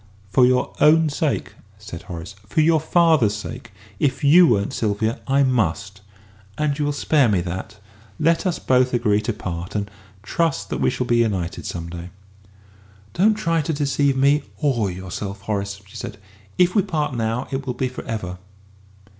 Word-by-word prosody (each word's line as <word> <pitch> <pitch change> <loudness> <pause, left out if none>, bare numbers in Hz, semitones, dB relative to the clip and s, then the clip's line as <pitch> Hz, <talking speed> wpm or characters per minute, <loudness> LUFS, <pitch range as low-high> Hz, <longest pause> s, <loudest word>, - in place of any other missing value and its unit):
"For 125 -2 +5
your 125 0 +1
own 160 +1 +5
sake," 145 +1 -2 0.2
said 100 -5 -9
Horace; 85 +1 -8
"for 155 - +1
your 160 0 +4
father's 160 - +3
sake. 120 +4 -7 0.3
If 140 0 0
you 165 +5 +7
won't, 105 0 +1
Sylvia, 110 0 -1
I 140 +1 +3
must. 100 -5 -1 0.6
And 150 -1 0
you 145 - +1
will 145 - 0
spare 145 -3 +2
me 95 -4 +2
that? 95 +5 -6 0.4
Let 165 +4 +2
us 175 - -1
both 125 -1 +2
agree 105 -3 +2
to 110 - -2
part 90 -4 -6
and 105 -1 0
and 100 - -20 0.3
trust 165 +8 -1
that - - -2
we - - +3
shall 125 0 -2
be 120 -1 +2
united 100 -7 -1
some 85 -1 -5
day." 85 +1 -8 1.0
"Don't 210 +4 +3
try 165 -6 0
to 155 +2 -2
deceive 140 -1 +1
me 140 +3 +4 0.2
or 120 -9 +1
yourself, 95 +2 -6
Horace," 100 -1 -3
she 100 - -12
said; - - -6 0.4
"if 180 0 +4
we 205 - +4
part 150 -6 -2
now, 115 +1 -2
it 135 +1 -3
will 125 - -2
be 130 +1 -1
for 125 - -8
ever." 95 -7 -5
125 Hz, 180 wpm, -22 LUFS, 100-145 Hz, 1.0 s, you